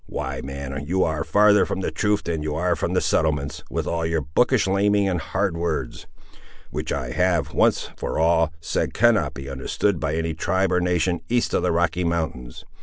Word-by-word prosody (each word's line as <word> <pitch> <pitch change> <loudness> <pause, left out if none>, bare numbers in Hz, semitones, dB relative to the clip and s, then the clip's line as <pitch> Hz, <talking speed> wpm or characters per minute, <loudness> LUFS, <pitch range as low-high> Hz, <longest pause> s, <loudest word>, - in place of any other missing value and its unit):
Why, - - -4
man, 70 0 -5
you 95 +3 +2
are 80 0 -1
farther 105 +3 +5
from 95 - -3
the - - -2
truth 105 -1 0
than 80 -2 -2
you 75 0 -3
are 90 +3 +1
from - - -2
the - - +3
settlements, 75 -2 0
with - - -2
all 85 0 -1
your 80 -1 0
bookish 75 +2 +2
larning 100 +1 +2
and 90 -3 -1
hard 95 +2 -1
words; 80 -7 -3 0.6
which - - -4
I 65 -4 -3
have, 85 -2 +1
once - - +2
for - - -4
all, 80 0 +3
said 80 - -2
cannot 120 -2 +3
be 70 +1 -7
understood 70 +7 -1
by 80 0 -1
any 80 0 -1
tribe 95 +4 0
or 90 0 +2
nation 90 0 +1
east 120 0 +1
of - - +2
the - - +1
Rocky 85 +1 +1
Mountains. 80 -8 -3
85 Hz, 195 wpm, -23 LUFS, 75-95 Hz, 0.6 s, farther